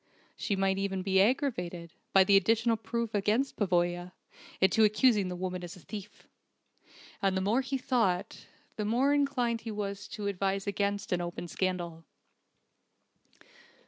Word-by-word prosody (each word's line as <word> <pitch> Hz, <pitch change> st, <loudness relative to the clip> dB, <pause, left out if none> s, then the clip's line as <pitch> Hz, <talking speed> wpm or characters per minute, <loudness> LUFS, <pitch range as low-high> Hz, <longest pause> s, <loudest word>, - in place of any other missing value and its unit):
She 205 Hz, -, -1 dB
might 195 Hz, 0 st, +1 dB
even 195 Hz, -1 st, -2 dB
be 190 Hz, 0 st, +3 dB
aggravated, 180 Hz, -, -1 dB, 0.2 s
by 195 Hz, -, +7 dB
the 200 Hz, +1 st, +4 dB
additional 225 Hz, +4 st, +3 dB
proof 225 Hz, +1 st, -3 dB
against 215 Hz, +7 st, +1 dB
Pavoya, 175 Hz, -2 st, 0 dB, 0.5 s
into 190 Hz, +4 st, +4 dB
accusing 215 Hz, -1 st, +4 dB
the 180 Hz, -, -4 dB
woman 180 Hz, 0 st, -4 dB
as 175 Hz, +2 st, -7 dB
a -, -, -13 dB
thief! 210 Hz, +1 st, -9 dB, 0.9 s
And 195 Hz, -1 st, +1 dB
the -, -, 0 dB
more 215 Hz, +7 st, +2 dB
he 270 Hz, +1 st, -2 dB
thought, 225 Hz, -9 st, -1 dB, 0.3 s
the 210 Hz, -, -2 dB
more 250 Hz, +6 st, +2 dB
inclined 255 Hz, -5 st, +1 dB
he 225 Hz, -, -6 dB
was 200 Hz, -1 st, -4 dB
to 210 Hz, -, -4 dB
advise 195 Hz, 0 st, -1 dB
against 200 Hz, 0 st, -1 dB
an 180 Hz, -1 st, +1 dB
open 175 Hz, 0 st, -5 dB
scandal. 175 Hz, -2 st, -3 dB
200 Hz, 145 wpm, -30 LUFS, 185-225 Hz, 0.9 s, by